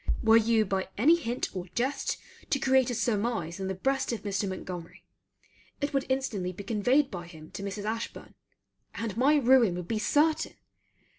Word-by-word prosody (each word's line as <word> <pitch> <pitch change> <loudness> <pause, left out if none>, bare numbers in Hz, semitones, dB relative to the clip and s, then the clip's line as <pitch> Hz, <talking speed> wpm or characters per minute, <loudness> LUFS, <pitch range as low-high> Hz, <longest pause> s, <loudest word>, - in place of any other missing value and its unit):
Were 225 0 +6
you 225 -1 +4
by 190 -1 -2
any 295 +11 +6
hint 245 -10 -3
or 185 0 -4
jest 270 +3 -1 0.3
to - - +2
create 265 -2 +3
a 245 - -1
surmise 215 -6 -1
in 190 - -3
the 190 - -2
breast 270 +8 0
of 230 - -4
Mr. 200 -1 -1
Montgomery, 180 -2 -7 0.8
it 285 0 -2
would 275 -1 0
instantly 250 -9 -1
be 185 +3 -8
conveyed 245 +7 +2
by 175 -3 -6
him 160 -2 -13
to - - -7
Mrs. 200 +1 -5
Ashburn; 225 +2 -4 0.6
and 225 -4 -3
my 270 +6 +4
ruin 250 -8 +5
would 180 -1 -5
be 220 +1 -1
certain. 300 +8 +2
225 Hz, 175 wpm, -29 LUFS, 190-265 Hz, 0.8 s, Were